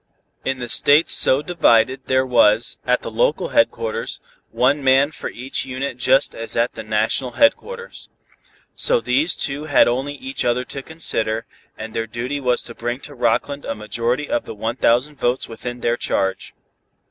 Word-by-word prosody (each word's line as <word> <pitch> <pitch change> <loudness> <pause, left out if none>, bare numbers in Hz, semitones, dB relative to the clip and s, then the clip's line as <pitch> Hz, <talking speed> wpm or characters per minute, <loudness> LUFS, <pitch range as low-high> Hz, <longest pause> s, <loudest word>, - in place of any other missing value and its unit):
In 130 0 -1
the 120 -1 -5
states 145 +6 +4
so 135 +3 +4
divided, 135 -6 +2
there 130 0 +2
was, 115 -2 +3
at - - +2
the - - -5
local - - 0
headquarters, 475 +1 0 0.3
one 140 +3 +1
man 135 +2 +4
for 150 - -6
each 130 +3 -4
unit 130 0 -4
just 135 +2 +3
as 115 0 -5
at 120 +1 +1
the 110 - -7
national 110 +4 0
headquarters. 475 +11 0 0.6
So - - +3
these 315 -7 +1
two 145 +2 -3
had 145 -3 +4
only 135 +4 -1
each 135 -1 -4
other 125 +1 0
to 135 - -7
consider, 115 -8 -2 0.3
and 110 0 -7
their 115 -1 -2
duty 125 +6 -4
was 125 -2 +1
to 115 - -9
bring 120 +2 -4
to 145 - -10
Rockland 125 +3 0
a - - -4
majority 115 +6 -2
of 120 - -1
the - - -8
one 110 +3 -3
thousand 130 +6 +2
votes 120 +2 0
within 120 +2 -7
their 120 0 0
charge. 95 -4 -2
130 Hz, 170 wpm, -20 LUFS, 115-145 Hz, 0.6 s, states